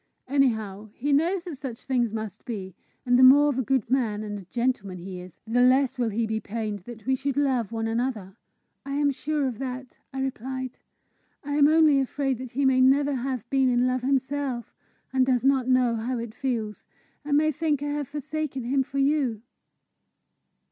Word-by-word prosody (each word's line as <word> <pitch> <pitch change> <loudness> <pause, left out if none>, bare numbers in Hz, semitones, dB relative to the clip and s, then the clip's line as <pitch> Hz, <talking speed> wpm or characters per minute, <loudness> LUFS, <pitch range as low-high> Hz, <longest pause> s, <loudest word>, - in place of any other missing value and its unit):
Anyhow, 220 -7 0
he 285 +3 0
knows 340 +5 +2
that 340 -6 -7
such 255 -4 -7
things 245 -4 +1
must 220 -2 -6
be; 195 -6 -6 0.3
and 245 0 +4
the - - +7
more 285 +3 +8
of 265 -2 -1
a - - +3
good 260 -2 0
man 230 -5 0
and 205 -1 -5
a 190 - -12
gentleman 230 -3 -2
he 180 +1 -7
is, 180 -1 -13
the 235 +2 +1
less 260 +1 +3
will 235 -2 +1
he 225 +2 -1
be 220 0 -2
pained 215 -1 -4
that 220 +3 -11
we 265 +1 +2
should 275 +1 -3
love 260 -7 +1
one 225 -1 -2
another!" 225 -4 -2 0.5
"I 275 0 -4
am 290 0 +2
sure 290 +1 -1
of 240 -4 -5
that," 255 -1 -6
I 270 - -5
replied. 260 0 -4 0.6
"I 290 - -6
am 290 0 +5
only 310 -2 +5
afraid 270 -1 -1
that 255 -2 -8
he 275 +3 +1
may 260 -1 +4
never 280 +2 +4
have 255 -3 -3
been 270 -1 +3
in 245 0 +2
love 255 0 0
himself, 265 -1 -1 0.4
and 260 -1 +4
does 255 -2 +1
not 270 -2 +3
know 250 -2 +3
how 240 +3 -2
it 230 -1 -5
feels, 230 -6 -3 0.4
and 285 0 +2
may 310 +1 +3
think 300 -1 -1
I 290 - -2
have 290 -1 -2
forsaken 295 -2 -4
him 270 +3 +1
for 265 +1 -5
you." 275 -6 +1
255 Hz, 195 wpm, -26 LUFS, 230-275 Hz, 0.6 s, more